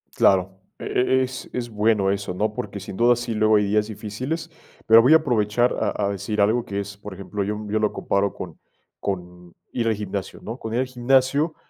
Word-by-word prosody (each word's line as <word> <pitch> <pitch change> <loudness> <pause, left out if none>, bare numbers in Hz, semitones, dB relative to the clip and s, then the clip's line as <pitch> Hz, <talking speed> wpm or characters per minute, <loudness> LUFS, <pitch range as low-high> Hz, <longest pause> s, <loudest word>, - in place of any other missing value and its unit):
Claro, 95 0 +3 0.2
e 130 +1 +1
e - - +3
es, 130 0 -6
es 120 -1 -3
bueno 105 -2 +2
eso, 100 -2 -3
¿no? 105 +3 0
Porque 100 -1 -5
sin 95 - -8
duda 120 +1 +5
sí, 120 -1 -4
luego 110 0 +3
hay 105 -1 +3
días 105 +1 +1
difíciles, 125 +11 -5 0.3
pero 115 +1 +8
voy 130 +7 +6
a - - +10
aprovechar 120 -5 +1
a 105 - -1
a - - +1
decir 105 +2 -3
algo 110 +4 +3
que 100 0 -3
es, 100 0 -6
por 100 0 -9
ejemplo, 100 +1 -4
yo 105 +2 -2
yo 110 +1 +1
lo 105 -1 +1
comparo 100 0 0
con - - -8 0.4
con 90 -2 -5 0.2
ir 115 -2 -1
al 110 - +2
gimnasio, 100 -2 -5
¿no? 115 +3 -6
Con 110 - -5
ir 120 - +2
al - - 0
gimnasio, 130 +5 +2
105 Hz, 215 wpm, -23 LUFS, 100-120 Hz, 0.4 s, a